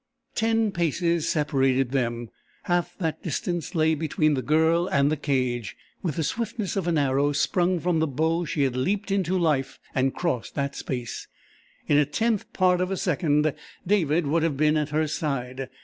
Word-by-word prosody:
Ten 225 Hz, -1 st, +1 dB
paces 170 Hz, -1 st, 0 dB
separated 135 Hz, -4 st, +1 dB
them; 120 Hz, -3 st, -1 dB, 0.3 s
half 175 Hz, -1 st, -1 dB
that 165 Hz, -5 st, -2 dB
distance 175 Hz, +1 st, -3 dB
lay 160 Hz, 0 st, +3 dB
between 155 Hz, 0 st, +1 dB
the 135 Hz, -, 0 dB
Girl 160 Hz, +6 st, +2 dB
and 140 Hz, -6 st, +2 dB
the -, -, +2 dB
cage. 125 Hz, -7 st, -1 dB, 0.2 s
With 165 Hz, -6 st, -2 dB
the 160 Hz, -, -1 dB
swiftness 220 Hz, -, -2 dB
of 190 Hz, -3 st, -1 dB
an 170 Hz, -2 st, +2 dB
arrow 140 Hz, +1 st, +2 dB
sprung 180 Hz, +3 st, +1 dB
from 170 Hz, -1 st, +1 dB
the 160 Hz, -, +2 dB
bow 160 Hz, +5 st, 0 dB
she 150 Hz, -2 st, 0 dB
had 130 Hz, -2 st, 0 dB
leaped 195 Hz, +10 st, -1 dB
into 190 Hz, -1 st, +1 dB
life 150 Hz, -6 st, 0 dB, 0.2 s
and 135 Hz, +1 st, +2 dB
crossed 165 Hz, -10 st, -2 dB
that 140 Hz, -1 st, -2 dB
space. 125 Hz, -3 st, -5 dB, 0.6 s
In 145 Hz, -, +4 dB
a 150 Hz, -, +4 dB
tenth 220 Hz, +7 st, -1 dB
part 180 Hz, -1 st, +2 dB
of 185 Hz, -, 0 dB
a 195 Hz, -, -2 dB
second 150 Hz, -5 st, +1 dB, 0.3 s
David 170 Hz, -4 st, +2 dB
would 160 Hz, +4 st, +1 dB
have 160 Hz, -4 st, 0 dB
been 155 Hz, +1 st, +3 dB
at 150 Hz, -1 st, 0 dB
her 155 Hz, +1 st, +1 dB
side. 135 Hz, -4 st, -3 dB
155 Hz, 180 wpm, -25 LUFS, 140-175 Hz, 0.6 s, In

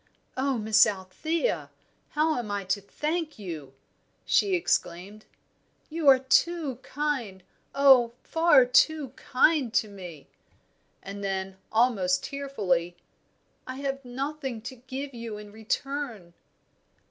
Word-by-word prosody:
"Oh, 265 Hz, 0 st, 0 dB
Miss 220 Hz, 0 st, +5 dB
Althea, 215 Hz, -, -2 dB, 0.5 s
how 310 Hz, +1 st, +3 dB
am 230 Hz, -3 st, -5 dB
I 205 Hz, -1 st, -2 dB
to 190 Hz, +2 st, -1 dB
thank 305 Hz, -, -3 dB
you?" 160 Hz, -9 st, -8 dB, 0.5 s
she 390 Hz, -2 st, +3 dB
exclaimed. 205 Hz, -, -2 dB, 0.7 s
"You 320 Hz, -2 st, -2 dB
are 270 Hz, -1 st, +9 dB
too 270 Hz, +1 st, +1 dB
kind, 260 Hz, -9 st, -3 dB, 0.3 s
oh, 265 Hz, -4 st, +6 dB
far 340 Hz, +10 st, +5 dB
too 315 Hz, -, +3 dB
kind 265 Hz, +1 st, +2 dB
to 215 Hz, -, +3 dB
me." 180 Hz, -7 st, -10 dB, 0.8 s
And 200 Hz, +1 st, -7 dB
then, 190 Hz, -1 st, -3 dB
almost 215 Hz, -6 st, +2 dB
tearfully, 190 Hz, -12 st, -2 dB, 0.7 s
"I 255 Hz, -, -5 dB
have 275 Hz, 0 st, -3 dB
nothing 265 Hz, 0 st, -4 dB
to 260 Hz, -, -7 dB
give 265 Hz, +3 st, -6 dB
you 230 Hz, -3 st, -6 dB
in 210 Hz, 0 st, -10 dB
return." 225 Hz, -3 st, -4 dB
250 Hz, 115 wpm, -27 LUFS, 200-285 Hz, 0.8 s, are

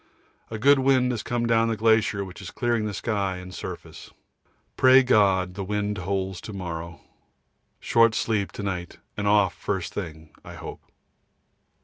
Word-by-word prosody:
A 110 Hz, -, -5 dB
good 140 Hz, +5 st, +5 dB
wind 130 Hz, -1 st, +3 dB
has 115 Hz, -4 st, -3 dB
come 120 Hz, +2 st, -2 dB
down 115 Hz, -1 st, +3 dB
the 115 Hz, -1 st, -1 dB
glacier 110 Hz, -2 st, +2 dB
which 95 Hz, +1 st, -10 dB
is 90 Hz, -, -7 dB
clearing 120 Hz, -2 st, -1 dB
the 105 Hz, -, -4 dB
sky 100 Hz, -4 st, -1 dB
and 90 Hz, 0 st, -9 dB
surface. -, -, -8 dB, 0.7 s
Pray 130 Hz, +1 st, +6 dB
God 95 Hz, -7 st, +3 dB
the 100 Hz, +1 st, -5 dB
wind 105 Hz, 0 st, -2 dB
holds 95 Hz, 0 st, -3 dB
to 110 Hz, -, -8 dB
morrow. 85 Hz, -3 st, -6 dB, 0.8 s
Short 115 Hz, -1 st, +3 dB
sleep 105 Hz, -3 st, 0 dB
to 105 Hz, -, -6 dB
night 90 Hz, -3 st, -4 dB, 0.2 s
and 105 Hz, 0 st, -2 dB
off 100 Hz, -2 st, +4 dB
first 95 Hz, -4 st, -4 dB
thing, 80 Hz, -5 st, -7 dB
I -, -, -10 dB
hope. -, -, -8 dB
105 Hz, 160 wpm, -25 LUFS, 95-115 Hz, 0.8 s, Pray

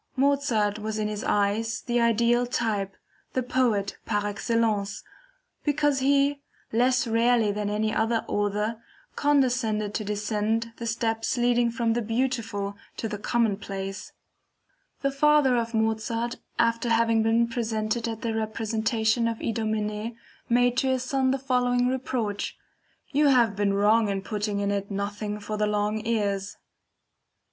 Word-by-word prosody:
Mozart 260 Hz, -7 st, +1 dB
was 215 Hz, 0 st, -3 dB
in 215 Hz, -1 st, 0 dB
his 210 Hz, 0 st, -4 dB
eyes 210 Hz, +3 st, 0 dB
the 240 Hz, -1 st, 0 dB
ideal 235 Hz, +1 st, +3 dB
type, 210 Hz, -6 st, -2 dB, 0.4 s
the 255 Hz, -, 0 dB
Poet 235 Hz, -6 st, 0 dB
par 205 Hz, -2 st, -1 dB
excellence, 205 Hz, -1 st, -1 dB, 0.6 s
because 290 Hz, -1 st, +2 dB
he, 280 Hz, +1 st, +2 dB, 0.3 s
less 250 Hz, +3 st, +3 dB
rarely 230 Hz, -1 st, +3 dB
than 205 Hz, 0 st, -2 dB
any 215 Hz, +1 st, 0 dB
other 225 Hz, +1 st, +1 dB
author, 210 Hz, +2 st, -1 dB, 0.3 s
condescended 245 Hz, -7 st, +1 dB
to 215 Hz, -, -2 dB
descend 210 Hz, +2 st, -1 dB
the 235 Hz, -, -5 dB
steps 225 Hz, +1 st, -1 dB
leading 240 Hz, 0 st, +3 dB
from 230 Hz, -1 st, 0 dB
the 240 Hz, -, 0 dB
beautiful 225 Hz, -3 st, -2 dB, 0.2 s
to 225 Hz, -, -2 dB
the 210 Hz, -1 st, -5 dB
commonplace. 195 Hz, -4 st, -2 dB, 0.9 s
The 275 Hz, -, +2 dB
father 290 Hz, -2 st, +4 dB
of 230 Hz, -1 st, -1 dB
Mozart 225 Hz, +2 st, -1 dB, 0.2 s
after 230 Hz, +1 st, +1 dB
having 230 Hz, -1 st, +3 dB
been 225 Hz, +1 st, +3 dB
present 220 Hz, -3 st, -1 dB
at 230 Hz, -1 st, -4 dB
a 225 Hz, -, 0 dB
representation 220 Hz, +1 st, 0 dB
of 230 Hz, -1 st, -2 dB
IDOMENEE 220 Hz, 0 st, -2 dB, 0.3 s
made 245 Hz, +1 st, +3 dB
to 265 Hz, -, +2 dB
his 260 Hz, -1 st, +1 dB
son 260 Hz, 0 st, +1 dB
the 265 Hz, -, +2 dB
following 250 Hz, -2 st, +1 dB
reproach: 245 Hz, -5 st, -2 dB, 0.5 s
"You 295 Hz, +1 st, +3 dB
have 240 Hz, -6 st, +4 dB
been 200 Hz, 0 st, +1 dB
wrong 210 Hz, +2 st, +3 dB
in 195 Hz, -1 st, -2 dB
putting 210 Hz, -1 st, -2 dB
in 200 Hz, 0 st, 0 dB
it 200 Hz, 0 st, -2 dB
nothing 205 Hz, +1 st, -3 dB
for 210 Hz, +1 st, -4 dB
the 210 Hz, 0 st, +1 dB
long 210 Hz, +1 st, 0 dB
ears." 200 Hz, -3 st, -1 dB
225 Hz, 140 wpm, -26 LUFS, 210-245 Hz, 0.9 s, father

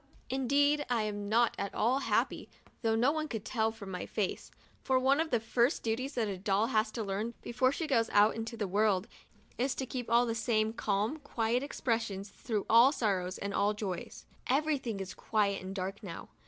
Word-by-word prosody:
Indeed, 285 Hz, +3 st, +2 dB
I'm 210 Hz, -4 st, -1 dB
not 235 Hz, +2 st, +3 dB
at 200 Hz, -, -3 dB
all 245 Hz, +5 st, +2 dB
happy -, -, 0 dB, 0.2 s
— -, -, -28 dB
though 225 Hz, -2 st, +2 dB
no 245 Hz, +5 st, +3 dB
one 310 Hz, 0 st, -2 dB
could 225 Hz, -7 st, -5 dB
tell 220 Hz, -3 st, +1 dB
it 225 Hz, -, -9 dB
from 200 Hz, -3 st, -8 dB
my 180 Hz, -, -5 dB
face 205 Hz, -4 st, -2 dB, 0.2 s
— -, -, -32 dB
for 260 Hz, -, +2 dB
one 270 Hz, +3 st, +3 dB
of 320 Hz, 0 st, 0 dB
the 240 Hz, -5 st, +2 dB
first 235 Hz, +5 st, +1 dB
duties 255 Hz, +5 st, -2 dB
that 230 Hz, -3 st, +1 dB
a 195 Hz, -2 st, -4 dB
doll 200 Hz, +2 st, +2 dB
has 215 Hz, 0 st, +3 dB
to 230 Hz, -, -3 dB
learn, 210 Hz, +4 st, -3 dB
before 255 Hz, +2 st, +2 dB
she 325 Hz, -, -3 dB
goes 235 Hz, -7 st, +2 dB
out 205 Hz, +1 st, +4 dB
into 225 Hz, +1 st, -5 dB
the 210 Hz, -2 st, -1 dB
world, 200 Hz, 0 st, +2 dB, 0.5 s
is 260 Hz, +2 st, +1 dB
to 265 Hz, -, -3 dB
keep 250 Hz, -1 st, -5 dB
the 235 Hz, 0 st, +3 dB
same 220 Hz, -1 st, +1 dB
calm, 215 Hz, +5 st, -1 dB
quiet 240 Hz, -4 st, 0 dB
expression 225 Hz, -8 st, -2 dB
through 210 Hz, +1 st, -4 dB
all 235 Hz, +4 st, +7 dB
sorrows 195 Hz, -9 st, -1 dB
and 200 Hz, 0 st, -4 dB
all 205 Hz, +1 st, +2 dB
joys. 195 Hz, -4 st, -5 dB, 0.2 s
Everything 270 Hz, -6 st, 0 dB
is 190 Hz, -1 st, -5 dB
very -, -, -21 dB
quiet 205 Hz, -3 st, +2 dB
and 190 Hz, +1 st, -7 dB
dark 195 Hz, +2 st, -4 dB
now. 180 Hz, -6 st, -8 dB
225 Hz, 210 wpm, -31 LUFS, 205-255 Hz, 0.5 s, all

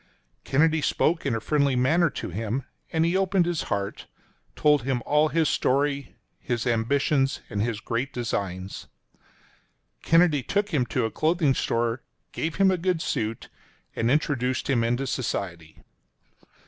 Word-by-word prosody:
Kennedy 160 Hz, +3 st, +2 dB
spoke 160 Hz, +2 st, +1 dB
in 125 Hz, -, +1 dB
a -, -, -1 dB
friendly 140 Hz, +2 st, +1 dB
manner 160 Hz, +7 st, +3 dB
to -, -, -6 dB
him, 115 Hz, +7 st, -3 dB, 0.3 s
and 160 Hz, 0 st, +2 dB
he 170 Hz, +2 st, +1 dB
opened 190 Hz, -2 st, +2 dB
his 175 Hz, -2 st, -1 dB
heart 100 Hz, -2 st, -3 dB, 0.2 s
— -, -, -40 dB
told 150 Hz, -2 st, +3 dB
him 125 Hz, -1 st, -2 dB
all 150 Hz, +1 st, +3 dB
his 160 Hz, 0 st, +1 dB
story, 140 Hz, 0 st, 0 dB, 0.2 s
his 120 Hz, 0 st, -2 dB
ambition 135 Hz, +4 st, +2 dB, 0.2 s
and 100 Hz, -, -1 dB
his 115 Hz, -1 st, -1 dB
great 120 Hz, +5 st, -3 dB
designs. 95 Hz, -6 st, -4 dB, 1.1 s
Kennedy 165 Hz, -3 st, +4 dB
took 205 Hz, +9 st, -1 dB
him 140 Hz, -9 st, 0 dB
to 125 Hz, -1 st, 0 dB
a 110 Hz, -, -2 dB
clothing 155 Hz, -, +2 dB
store, 115 Hz, 0 st, -1 dB, 0.3 s
gave 160 Hz, -1 st, -3 dB
him 195 Hz, -1 st, +4 dB
a 185 Hz, -, 0 dB
good 180 Hz, -1 st, 0 dB
suit, 115 Hz, -8 st, -3 dB, 0.5 s
and 115 Hz, -, 0 dB
introduced 130 Hz, -3 st, 0 dB
him 125 Hz, -4 st, +2 dB
into 120 Hz, +4 st, 0 dB
society. 90 Hz, -11 st, -4 dB
135 Hz, 150 wpm, -25 LUFS, 115-160 Hz, 1.1 s, Kennedy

